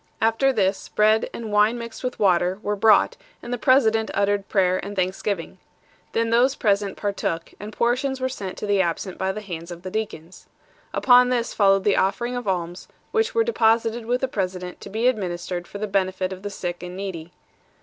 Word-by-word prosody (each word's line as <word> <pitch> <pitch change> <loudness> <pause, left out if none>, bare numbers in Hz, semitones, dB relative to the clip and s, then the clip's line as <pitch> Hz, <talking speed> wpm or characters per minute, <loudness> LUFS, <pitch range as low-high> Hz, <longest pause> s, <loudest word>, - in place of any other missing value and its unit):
After 225 +5 +3
this, 195 -5 0
bread, 215 +1 +3
and 225 -2 -6
wine 210 +3 +3
mixed 230 0 -8
with 250 -1 -3
water, 185 -2 +2
were 210 0 -1
brought, 210 0 +4 0.3
and 245 - -5
the - - -1
president 225 -4 +3
uttered 200 0 0
prayer 185 -2 +2
and 205 +1 -6
thanksgiving. 185 -1 -2 0.5
Then 230 0 0
those 250 +4 +4
present 200 -2 0
partook, 195 -5 -3
and 210 +2 -7
portions 255 +4 0
were 260 - 0
sent 200 -7 -6
to - - -4
the 200 -2 +2
absent 175 +1 -3
by 190 0 0
the 215 - -6
hands 170 -4 -7
of 175 0 -9
the 185 - -6
deacons. 190 -5 -6 0.4
Upon 250 -1 +5
this 240 -2 -1
followed 195 -2 +4
the 205 - +2
offering 240 +6 0
of 245 -3 -5
alms, 175 -1 -3 0.2
which 450 +2 0
were 455 - +4
deposited 230 - +1
with 245 +1 0
the 265 - +1
president 185 -5 -4
to - - -9
be 225 +4 0
administered 180 -6 -2
for - - -8
the 210 - -2
benefit 190 -2 -1
of 185 - -10
the 205 - -4
sick 175 -3 -5
and 180 +1 -7
needy. 175 -4 -6
205 Hz, 195 wpm, -23 LUFS, 185-230 Hz, 0.5 s, Upon